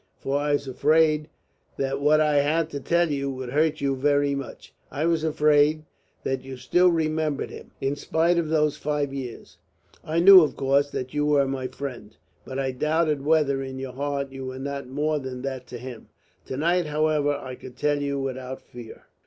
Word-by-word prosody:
For 140 Hz, +1 st, -1 dB
I 145 Hz, 0 st, 0 dB
was 140 Hz, -1 st, -1 dB
afraid 155 Hz, +3 st, +2 dB, 0.5 s
that 135 Hz, 0 st, -2 dB
what 150 Hz, +2 st, +4 dB
I 150 Hz, -1 st, +3 dB
had 155 Hz, +3 st, +1 dB
to 140 Hz, -, -4 dB
tell 170 Hz, +2 st, +1 dB
you 140 Hz, -1 st, -1 dB
would 130 Hz, -2 st, -5 dB
hurt 155 Hz, +1 st, +1 dB
you 140 Hz, -1 st, +1 dB
very 145 Hz, +1 st, +2 dB
much. 140 Hz, -1 st, -7 dB, 0.2 s
I 150 Hz, +3 st, -2 dB
was 165 Hz, -2 st, +1 dB
afraid 150 Hz, 0 st, +3 dB, 0.4 s
that 130 Hz, -1 st, -2 dB
you 135 Hz, -1 st, -8 dB
still 180 Hz, +8 st, +3 dB
remembered 155 Hz, -3 st, -1 dB
him, -, -, -11 dB
in 135 Hz, +1 st, -1 dB
spite 170 Hz, +4 st, +1 dB
of 160 Hz, -2 st, -2 dB
those 150 Hz, -2 st, +1 dB
five 145 Hz, -2 st, -2 dB
years. 130 Hz, -4 st, -7 dB, 0.5 s
I 160 Hz, +2 st, -1 dB
knew, 190 Hz, +1 st, +10 dB
of 155 Hz, -, 0 dB
course, 140 Hz, +1 st, +2 dB
that 130 Hz, -1 st, -5 dB
you 150 Hz, 0 st, 0 dB
were 145 Hz, -2 st, +3 dB
my 135 Hz, -1 st, -3 dB
friend. 125 Hz, -4 st, -8 dB, 0.3 s
But 130 Hz, -, -7 dB
I 135 Hz, -1 st, -1 dB
doubted 150 Hz, +2 st, 0 dB
whether 145 Hz, -3 st, +2 dB
in 130 Hz, 0 st, -6 dB
your 130 Hz, -1 st, -6 dB
heart 140 Hz, +1 st, -3 dB
you 135 Hz, -1 st, -7 dB
were 130 Hz, 0 st, -6 dB
not 140 Hz, 0 st, -5 dB
more 150 Hz, +3 st, -1 dB
than 130 Hz, -2 st, -7 dB
that 130 Hz, -2 st, -5 dB
to 125 Hz, -, -7 dB
him. 125 Hz, -1 st, -9 dB, 0.4 s
To 130 Hz, -, -4 dB
night, 170 Hz, +3 st, +1 dB
however, 150 Hz, -1 st, +1 dB
I 130 Hz, -2 st, -7 dB
could 125 Hz, 0 st, -11 dB
tell 145 Hz, -1 st, +1 dB
you 140 Hz, 0 st, -1 dB
without 130 Hz, -1 st, -5 dB
fear." 120 Hz, -2 st, -12 dB
145 Hz, 195 wpm, -25 LUFS, 135-155 Hz, 0.5 s, knew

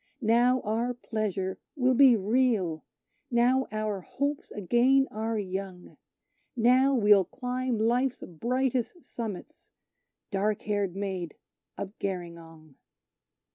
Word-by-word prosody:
Now 240 Hz, +3 st, +3 dB
our 230 Hz, +3 st, -1 dB
pleasure 205 Hz, -5 st, -3 dB, 0.2 s
will 260 Hz, -2 st, +2 dB
be 255 Hz, -1 st, +7 dB
real 210 Hz, -6 st, +1 dB, 0.5 s
now 250 Hz, +2 st, +2 dB
our 215 Hz, -2 st, -2 dB
hopes 280 Hz, +9 st, -3 dB
again 245 Hz, +7 st, +2 dB
are 220 Hz, +1 st, -2 dB
young: 190 Hz, -2 st, -5 dB, 0.6 s
Now 255 Hz, +3 st, +4 dB
we'll 205 Hz, -4 st, +5 dB
climb 250 Hz, +3 st, -3 dB
Life's 245 Hz, +4 st, +1 dB
brightest 255 Hz, -, -2 dB
summits, 215 Hz, -6 st, -7 dB, 0.6 s
dark 205 Hz, +1 st, 0 dB
haired 205 Hz, -3 st, -1 dB
Maid 190 Hz, -4 st, -4 dB, 0.4 s
of 200 Hz, +2 st, -6 dB
Gerringong. 170 Hz, -5 st, -7 dB
220 Hz, 100 wpm, -28 LUFS, 195-250 Hz, 0.6 s, be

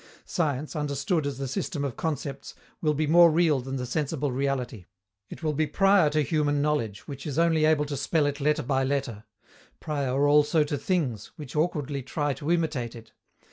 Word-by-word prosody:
Science, 150 Hz, -3 st, -2 dB
understood 145 Hz, +2 st, -1 dB
as 140 Hz, -3 st, -4 dB
the 135 Hz, 0 st, -3 dB
system 145 Hz, +3 st, -3 dB
of 135 Hz, -, -4 dB
concepts, 140 Hz, -3 st, -4 dB, 0.3 s
will 150 Hz, -2 st, +1 dB
be 155 Hz, +2 st, +1 dB
more 170 Hz, +3 st, +7 dB
real 160 Hz, -3 st, +3 dB
than 135 Hz, +2 st, -5 dB
the 125 Hz, -1 st, -3 dB
sensible 145 Hz, +1 st, -2 dB
reality. 125 Hz, -6 st, -2 dB, 0.4 s
It -, -, -10 dB
will 155 Hz, -1 st, 0 dB
be 155 Hz, +1 st, 0 dB
prior 195 Hz, 0 st, +4 dB
to 150 Hz, 0 st, +1 dB
human 145 Hz, -1 st, +1 dB
knowledge, 140 Hz, -9 st, -1 dB
which 140 Hz, +1 st, -7 dB
is 145 Hz, -1 st, -4 dB
only 165 Hz, -2 st, +3 dB
able 155 Hz, -1 st, +3 dB
to 145 Hz, 0 st, -4 dB
spell 150 Hz, +3 st, +1 dB
it 145 Hz, 0 st, -2 dB
letter 150 Hz, +1 st, +1 dB
by 135 Hz, +1 st, +1 dB
letter; 130 Hz, -6 st, -2 dB, 0.5 s
prior 140 Hz, -2 st, 0 dB
also 150 Hz, +2 st, +4 dB
to 145 Hz, 0 st, -2 dB
things, 135 Hz, -, -1 dB
which 150 Hz, -3 st, -9 dB
awkwardly 150 Hz, -3 st, -1 dB
try 145 Hz, +3 st, -2 dB
to 145 Hz, +3 st, -6 dB
imitate 150 Hz, -9 st, -1 dB
it. 115 Hz, -1 st, -13 dB
145 Hz, 185 wpm, -27 LUFS, 135-155 Hz, 0.5 s, more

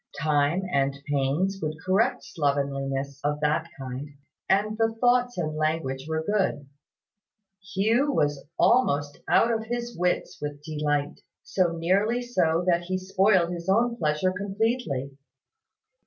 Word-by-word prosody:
Time 155 Hz, +3 st, +2 dB
and 140 Hz, 0 st, +1 dB
pains 145 Hz, +8 st, 0 dB
would 155 Hz, 0 st, -2 dB
correct 230 Hz, +7 st, +2 dB
slovenliness 140 Hz, -2 st, -2 dB
of 150 Hz, 0 st, 0 dB
that 155 Hz, +2 st, +1 dB
kind; 135 Hz, +1 st, -6 dB, 0.4 s
and 210 Hz, +2 st, +2 dB
the 225 Hz, 0 st, +1 dB
thoughts 245 Hz, -1 st, +3 dB
and 155 Hz, -3 st, -2 dB
language 155 Hz, -3 st, -1 dB
were 160 Hz, 0 st, -1 dB
good. 190 Hz, -7 st, 0 dB, 1.1 s
Hugh 230 Hz, +9 st, +2 dB
was 145 Hz, -, 0 dB
almost 145 Hz, -, +2 dB
out 235 Hz, -, +4 dB
of 220 Hz, -1 st, -1 dB
his 240 Hz, +1 st, -4 dB
wits 180 Hz, 0 st, -1 dB
with 145 Hz, 0 st, -5 dB
delight; 150 Hz, -2 st, -1 dB, 0.2 s
so 180 Hz, -3 st, +1 dB
nearly 200 Hz, +9 st, +1 dB
so 175 Hz, -8 st, +1 dB
that 175 Hz, -1 st, +2 dB
he 185 Hz, +1 st, -1 dB
spoiled 190 Hz, -1 st, +2 dB
his 170 Hz, +1 st, -5 dB
own 235 Hz, +4 st, +3 dB
pleasure 155 Hz, -1 st, +1 dB
completely. 200 Hz, -, -2 dB
170 Hz, 130 wpm, -26 LUFS, 145-210 Hz, 1.1 s, out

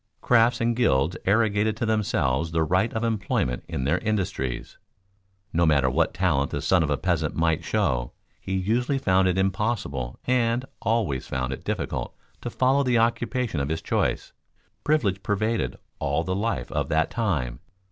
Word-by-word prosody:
Crafts 120 Hz, 0 st, +3 dB
and 115 Hz, 0 st, +1 dB
gilds 85 Hz, -, +2 dB
arrogated 105 Hz, +1 st, +2 dB
to 120 Hz, -, -1 dB
themselves 85 Hz, -9 st, 0 dB
the 80 Hz, 0 st, +1 dB
right 95 Hz, +8 st, +1 dB
of 110 Hz, -, -3 dB
employment 100 Hz, -, -1 dB
in 65 Hz, -, -3 dB
their 75 Hz, +7 st, +1 dB
industries. 95 Hz, -, -3 dB, 0.7 s
No 85 Hz, -, +2 dB
matter 70 Hz, -5 st, +3 dB
what -, -, +2 dB
talent 75 Hz, -7 st, +1 dB
the -, -, -3 dB
son 95 Hz, -2 st, +3 dB
of 80 Hz, -, 0 dB
a 75 Hz, -, +1 dB
peasant 80 Hz, -5 st, -1 dB
might 80 Hz, -1 st, +1 dB
show, -, -, 0 dB, 0.3 s
he 95 Hz, -, -4 dB
usually 120 Hz, +8 st, 0 dB
found 95 Hz, -7 st, +3 dB
it 90 Hz, 0 st, +1 dB
impossible 95 Hz, -, -1 dB
and 125 Hz, 0 st, +1 dB, 0.2 s
always 110 Hz, -, 0 dB
found 65 Hz, 0 st, -2 dB
it -, -, -8 dB
difficult -, -, -3 dB, 0.3 s
to -, -, -4 dB
follow 130 Hz, +3 st, +2 dB
the 125 Hz, -3 st, +2 dB
occupation 115 Hz, -, 0 dB
of 70 Hz, 0 st, -2 dB
his 80 Hz, +1 st, -3 dB
choice. -, -, -1 dB, 0.5 s
Privilege 105 Hz, -11 st, +1 dB
pervaded 110 Hz, +3 st, -1 dB, 0.2 s
all 70 Hz, +3 st, 0 dB
the 95 Hz, -, -2 dB
life 110 Hz, +4 st, -2 dB
of -, -, -1 dB
that 80 Hz, +1 st, +1 dB
time. 75 Hz, -, -1 dB
95 Hz, 165 wpm, -25 LUFS, 75-115 Hz, 0.7 s, Crafts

